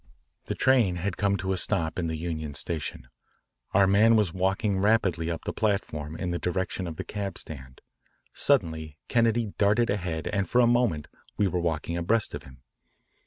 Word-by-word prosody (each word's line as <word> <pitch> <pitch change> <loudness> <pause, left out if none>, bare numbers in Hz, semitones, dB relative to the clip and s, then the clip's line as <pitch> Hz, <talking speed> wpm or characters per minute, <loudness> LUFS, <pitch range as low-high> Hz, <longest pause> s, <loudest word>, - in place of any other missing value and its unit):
The - - -3
train 120 -9 +3
had 90 +1 -2
come 100 -1 +1
to 95 +1 -1
a - - -2
stop 85 -3 -1
in 85 - -1
the 80 -1 -3
Union 80 -3 -4
Station. 75 -5 -4 0.6
Our 100 - +5
man 105 +4 +5
was 105 -7 +2
walking 95 +2 0
rapidly 95 -5 +2
up 85 -1 -4
the - - -2
platform 80 -8 -1
in 90 +1 -3
the 85 - -2
direction 95 0 -2
of 80 - -5
the - - -5
cab 100 -2 -5
stand. 65 -4 -6 0.5
Suddenly 80 - +1
Kennedy 115 -2 +2
darted 105 +3 +3
ahead 85 -6 -2
and 100 -2 -1
for 125 - +3
a 125 - +6
moment 120 -11 +2 0.3
we 105 - +3
were 90 -1 -1
walking 85 0 -2
abreast 105 +6 +1
of - - -5
him. 65 -1 -16
95 Hz, 180 wpm, -27 LUFS, 80-105 Hz, 0.6 s, a